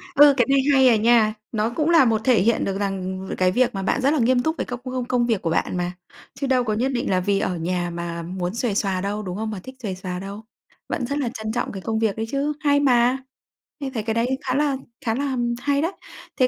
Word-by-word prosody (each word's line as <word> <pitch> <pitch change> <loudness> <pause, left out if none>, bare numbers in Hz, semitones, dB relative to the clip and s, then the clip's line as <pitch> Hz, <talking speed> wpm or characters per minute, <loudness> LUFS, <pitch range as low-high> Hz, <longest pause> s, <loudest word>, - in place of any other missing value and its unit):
Ừ, 290 -1 +8
cái 245 - +4
này 275 0 +4
hay 265 -1 +6
à 235 - +6
nha! 220 0 +4 0.2
Nó 220 0 0
cũng 300 +6 -1
là 330 -6 +6
một 225 -2 +2
thể 245 -6 +4
hiện 230 +4 +2
được 195 0 -2
rằng 190 -1 -3
cái 185 0 +3
việc 250 +4 +2
mà 195 - -3
bạn 240 +7 0
rất 275 +3 +3
là 310 - +1
nghiêm 245 +1 +3
túc 315 +1 0
về - - -2
các 245 -1 -5
công 255 - -6
công 255 -1 -2
công 245 -1 +1
việc 225 -5 0
của 165 - -1
bạn 165 - 0
mà, 175 0 -1 0.4
chứ 275 - -3
đâu 255 -1 +3
có 215 -3 -1
nhất 250 +5 0
định 250 0 -2
là 185 -1 +2
vì 195 +2 +1
ở 185 - -1
nhà 175 +1 -1
mà 170 0 -4
muốn 180 +2 -4
xuề 235 -3 -1
xoà 195 -3 0
đâu, 205 +2 -3
đúng 185 0 -5
không? 220 0 -3
Mà 205 - -5
thích 260 - -10
xuề 190 -3 -3
xoà 180 -1 -5
đâu, 200 +2 -7 0.5
vẫn 260 - -2
rất 280 +4 -2
là 270 -5 -1
trân 220 0 -4
trọng 240 +2 -2
cái 195 - -7
công 220 +2 -1
việc 220 -3 +1
đấy 225 - -2
chứ, 280 +2 0
hay 285 -2 +3
mà, 250 -2 +3 0.6
mình 270 -2 -5
thấy 220 -4 -2
cái 220 +1 -1
đấy 245 +4 0
khá 255 - +1
là 285 -1 +1 0.3
khá 225 -1 +1
là, 280 +1 -1
ừm, 240 -2 0
hay 285 0 +1
đấy. 330 - 0 0.5
Thế 255 - +5
230 Hz, 275 wpm, -23 LUFS, 195-260 Hz, 0.6 s, Ừ